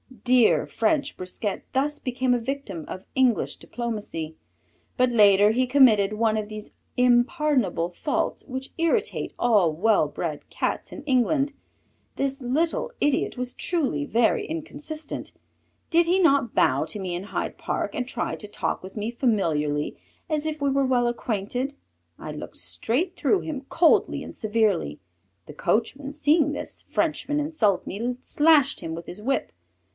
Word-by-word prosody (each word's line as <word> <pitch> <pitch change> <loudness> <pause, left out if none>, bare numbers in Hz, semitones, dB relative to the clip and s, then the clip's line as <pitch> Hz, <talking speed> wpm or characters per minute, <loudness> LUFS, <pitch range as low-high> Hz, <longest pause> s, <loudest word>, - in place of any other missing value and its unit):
Dear 250 -2 +4
French 280 +6 0
Brisquet 185 +2 -4
thus 290 +3 +1
became 255 -1 0
a 245 - +2
victim 230 - -5
of 185 - -7
English 260 -4 +2
diplomacy, 210 -10 -5 0.6
but 250 0 +3
later 205 -2 +6
he 255 +3 +2
committed 235 -7 +5
one 220 0 +1
of 215 -1 -2
these 215 0 -8 0.3
impardonable 250 - +2
faults 320 - -2
which 260 0 -6
irritate 400 +7 0
all 210 -9 +3
well 200 0 +3
bred 150 0 -5
Cats - - -2
in 295 - -8
England. 275 +1 +2 0.6
This 275 0 -1
little 320 - 0
idiot 290 -2 +1
was 250 0 -3
truly 270 - -1
very 230 +5 +2
inconsistent. 310 -1 -6 0.6
Did 340 0 +4
he 365 +3 +3
not 280 - +3
bow - - +3
to 210 - -5
me 185 -2 -3
in 180 +3 -5
Hyde - - -4
Park - - -2
and 250 - -2
try - - -3
to 210 - -8
talk 205 - -3
with 185 - -10
me 210 +2 -2
familiarly 160 - 0 0.3
as 305 -1 0
if 310 -1 -3
we 280 - +2
were 275 0 +2
well 245 -2 +2
acquainted? 240 +3 -2 0.4
I - - -7
looked - - -8
straight 345 +11 -1
through 395 - +2
him 295 -4 -4
coldly 330 -1 +3
and - - -9
severely. 210 - 0 0.5
The 150 - -10
coachman 270 - -1
seeing 300 0 +3
this - - -7
Frenchman 300 -2 0
insult 290 - +1
me 240 +5 -3
slashed 295 0 +3
him 160 - -4
with 170 0 -8
his 195 - -8
whip. 270 +5 -1
250 Hz, 150 wpm, -25 LUFS, 210-290 Hz, 0.6 s, later